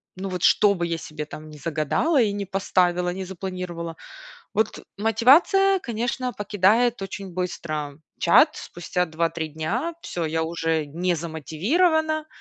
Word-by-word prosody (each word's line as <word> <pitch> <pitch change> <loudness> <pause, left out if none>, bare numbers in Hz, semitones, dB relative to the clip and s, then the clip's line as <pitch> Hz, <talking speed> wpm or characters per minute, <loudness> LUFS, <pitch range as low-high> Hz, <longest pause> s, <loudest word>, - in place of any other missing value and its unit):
ну 190 +1 -5
вот, 180 -1 -4
что 205 -1 +5
бы 175 -3 -2
я 165 -1 -2
себе 155 -1 -6
там 155 +1 -10
не 150 - -11
загадала 160 - +1
и 215 -3 +2
не 200 0 -3
поставила, 180 -2 +1
не 190 +1 -5
запланировала, 180 -3 -6 0.6
вот 215 +1 -1
мотивация, 285 - +4
конечно, 240 +1 -2
покидает 205 +3 +2
очень 195 -1 -6
быстро 155 -5 -4 0.2
чат. - - +6
Спустя 180 +1 -3
2-3 160 0 -2
дня 205 - -2
всё, 170 - -4
я 160 +1 -1
уже 165 -1 -1
не 175 +5 -1
замотивирована, 300 - 0
185 Hz, 140 wpm, -24 LUFS, 165-225 Hz, 0.6 s, чат